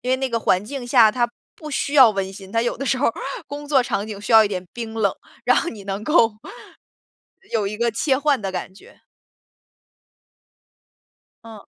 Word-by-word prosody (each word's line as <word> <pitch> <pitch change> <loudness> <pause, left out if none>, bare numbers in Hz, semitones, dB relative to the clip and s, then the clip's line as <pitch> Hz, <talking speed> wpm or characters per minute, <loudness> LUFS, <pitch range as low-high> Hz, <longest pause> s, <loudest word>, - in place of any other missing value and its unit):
因 250 - -3
为 260 - +3
那 265 +1 -2
个 230 -1 -1
环 185 -1 +1
境 255 +2 -6
下， 235 -4 +6
它 240 -1 +1 0.3
不 305 -1 -9
需 280 0 -2
要 265 -5 +8
温 195 -2 -3
馨， 195 -1 -11
它 230 +2 +1
有 240 - -1
的 275 - -5
时 265 - +1
候 265 - +1
儿 230 - -2 0.3
工 290 +1 -7
作 270 -3 +4
场 215 -4 -3
景 210 -2 -6
需 205 +3 -4
要 220 0 +9
一 210 - 0
点 185 -2 -5
冰 230 -2 -6
冷， 215 -3 +1 0.3
然 - - +4
后 - - 0
你 205 - -9
能 200 +1 -4
够 240 -5 +3 1.2
有 215 -3 0
一 210 +2 -4
个 235 +1 +1
切 265 +5 +1
换 290 -4 +1
的 195 - -3
感 190 0 -6
觉。 - - -19 2.4
嗯。 220 -3 -12
230 Hz, 220 characters per minute, -21 LUFS, 205-265 Hz, 2.4 s, 要